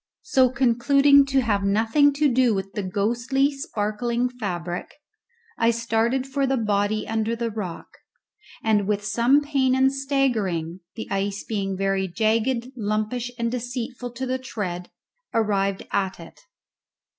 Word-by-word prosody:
So, 265 - +4
concluding 275 +3 +4
to 270 -1 +2
have 210 -5 +1
nothing 225 +9 +3
to 295 +1 +2
do 250 -3 +3
with 195 0 -4
the 210 - -2
ghostly 235 +9 0
sparkling 235 - -1
fabric, 180 -8 -5 0.6
I 230 - +4
started 230 +2 0
for 270 0 -1
the 270 0 +1
body 210 -1 0
under 225 +1 -1
the 230 0 -2
rock, 195 -6 -5 0.8
and 210 -3 +2
with 205 -1 -1
some 235 +7 +3
pain 275 -3 +1
and 265 +1 +3
staggering, 225 - -1 0.2
the 225 - -6
ice 195 +1 -1
being 195 -3 -3
very 195 0 0
jagged, 230 +6 0
lumpish, 215 +2 -2
and 235 -1 -1
deceitful 245 0 -4
to 260 +2 -4
the 260 0 -1
tread, 185 -8 -5 0.5
arrived 200 -3 0
at 190 -2 -1
it. 165 - -12
230 Hz, 140 wpm, -24 LUFS, 205-260 Hz, 0.8 s, So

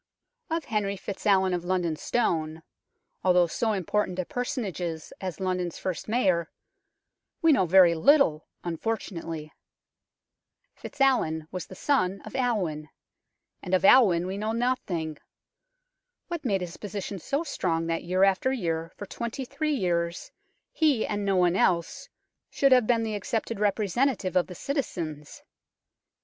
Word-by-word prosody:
Of 325 -1 -2
Henry 205 -3 -1
FitzAlwin 190 -1 +1
of 175 -1 -2
London 175 -3 0
Stone, 160 -6 -1 0.6
although 180 -1 +5
so 220 +6 -1
important 190 0 -1
a 185 - -1
personage 245 -6 -3
as 165 -3 -5 0.3
London's 180 -2 -2
first 185 -3 -4
Mayor, 185 -8 +1 0.9
we 325 - +6
know 190 -11 +3
very 180 -1 +7
little, 170 - +4 0.2
unfortunately. 165 -4 -4 1.2
FitzAlwin 160 - 0
was 185 -1 -5
the 185 - -11
son 200 -7 +1
of - - -9
Alwin, 185 - -1 0.7
and 185 -1 0
of 185 +1 +1
Alwin 190 -8 +6
we 190 +2 -4
know 215 +1 -1
nothing. 185 - -2 1.1
What 340 -2 -4
made 200 -7 0
his 175 -1 -6
position 200 -1 -5
so 280 - -2
strong 165 - -1
that 165 0 -1
year 185 +2 +1
after 195 +6 +3
year 165 -9 -2
for 205 - -6
twenty 235 +5 -5
three 295 +3 -1
years 170 -5 -1 0.4
he, 295 -8 +2
and 205 -1 -2
no 195 -1 +1
one 180 -1 +3
else, 190 +10 0 0.4
should 275 -1 +2
have 250 -4 +5
been 230 -2 +2
the 220 -1 -2
accepted 220 +1 -3
representative 210 +1 0
of 180 - +3
the 180 - -9
citizens 165 - -4
190 Hz, 135 wpm, -27 LUFS, 170-235 Hz, 1.2 s, very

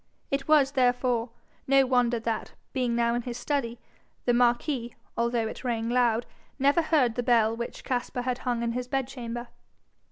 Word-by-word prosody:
It 275 0 -1
was, 295 -3 +5
therefore, 245 -3 +1 0.4
no 270 0 +5
wonder 245 -2 +2
that, 225 -1 -3 0.2
being 250 -3 0
now 235 0 +2
in 240 - 0
his 240 0 -5
study, 245 -3 -2 0.5
the 245 - +3
marquis, 240 +1 +1 0.2
although 235 -1 0
it - - -7
rang 230 -2 -1
loud, 240 -2 +2 0.3
never 285 +4 +4
heard 295 -7 +2
the 245 - -1
bell 230 -2 +3
which 235 +1 -6
Caspar 245 -1 -2
had 250 0 -1
hung 240 -2 -1
in 235 - 0
his 245 +1 -3
bedchamber. 245 -3 -4
245 Hz, 165 wpm, -27 LUFS, 235-260 Hz, 0.5 s, was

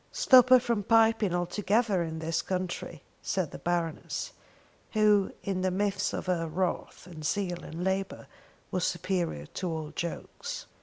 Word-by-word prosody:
"Stop 255 - +6
her 255 0 +9
from 235 -3 0
piping 225 -1 +4
altogether 200 +3 +1
in 160 -1 -3
dis 165 +1 -1
contry," 180 -3 -4 0.2
said 185 -6 -1
the - - -8
Baroness, 170 -2 -2 0.6
who 210 -2 +4
in 190 -2 -1
the 185 - +2
midst 200 +1 0
of - - -4
her 175 -3 0
wrath 175 +2 -3
and 165 -3 -10
zeal 180 +1 -1
and 165 +3 -6
labour 190 +1 -2 0.5
was 185 -1 -1
superior 175 - -1
to 180 - -4
all 160 -2 -4
jokes. 475 - -5
185 Hz, 150 wpm, -29 LUFS, 170-205 Hz, 0.6 s, her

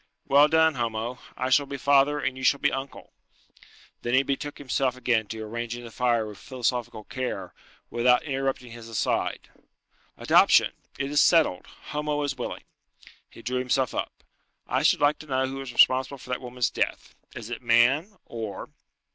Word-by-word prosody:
"Well 145 +2 +6
done, 160 0 +4
Homo. 120 0 -3 0.2
I 130 +1 -2
shall 140 +2 +4
be 140 0 -5
father, 140 +2 +3
and 135 -2 -2
you 130 - -8
shall 140 +2 +3
be - - +2
uncle." 135 +1 -7 0.9
Then 120 +1 0
he 135 - +4
betook 140 +2 -3
himself 130 -2 -1
again 115 -4 +1
to 110 +1 -6
arranging 120 +2 -5
the 115 - -10
fire 120 -2 +1
with 105 -2 -9
philosophical 125 -4 -3
care, 105 -7 -5 0.4
without 125 +1 +3
interrupting 135 -4 -3
his 115 -1 -10
aside. 110 -3 -1 0.7
"Adoption! - - +5 0.2
It 140 - -3
is 145 - +4
settled; 160 - +3 0.2
Homo 150 0 -1
is 145 -1 -2
willing." 125 - -6 0.7
He - - -14
drew 125 +1 -1
himself 130 0 0
up. - - -5 0.4
"I - - 0
should - - +3
like 145 +1 +3
to 155 - -11
know 130 -1 +1
who 135 +1 -5
is 135 -2 -7
responsible 130 +3 +4
for 125 -1 -10
that 125 - -2
woman's 125 -1 -2
death? - - -3 0.2
Is 115 0 -8
it 120 - -5
man? 130 - +3
or...." 110 -3 -6
130 Hz, 170 wpm, -26 LUFS, 120-140 Hz, 0.9 s, Well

